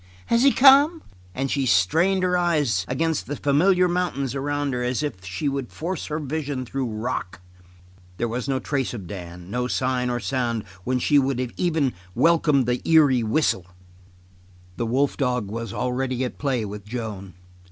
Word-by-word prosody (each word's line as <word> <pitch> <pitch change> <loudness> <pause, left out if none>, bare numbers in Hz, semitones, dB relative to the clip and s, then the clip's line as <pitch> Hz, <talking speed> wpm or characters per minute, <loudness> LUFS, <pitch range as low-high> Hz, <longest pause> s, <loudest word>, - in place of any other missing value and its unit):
Has 235 - +4
he 275 +1 +6
come?" 285 +6 +6 0.3
And 135 0 -2
she 135 -2 0
strained 165 - +3
her 180 0 +2
eyes 150 - +1
against 160 +4 -1
the 145 - -3
familiar 180 +7 +3
mountains 175 -7 -1
around 145 0 -2
her 125 - -2
as 125 +3 -1
if 95 -11 -4
she 95 +11 -3
would 135 -3 -3
force 170 +1 -4
her 150 - -2
vision 145 -3 -3
through 135 +1 -3
rock. 110 -5 -4 0.8
There 120 - -1
was 120 +3 -4
no 135 - +1
trace 135 -2 -2
of 100 -5 -7
Dan, 90 -1 -9
no 125 +2 -1
sign 125 -1 0
or 120 0 -1
sound 120 -4 -1 0.2
when 130 +1 +1
she 145 +3 +3
would 135 -2 0 0.2
even 160 -7 +1
have - - -22 0.2
welcomed 150 -1 +3
the 125 +1 -1
eerie 145 -6 +5
whistle. 110 - 0 1.1
The 120 - -2
wolf 135 +4 +1
dog 125 -7 -1
was 115 -1 -4
already 130 +2 -2
at 125 - -5
play 130 -6 0
with 105 0 -7
Joan. 105 -4 -6
130 Hz, 175 wpm, -24 LUFS, 120-150 Hz, 1.1 s, he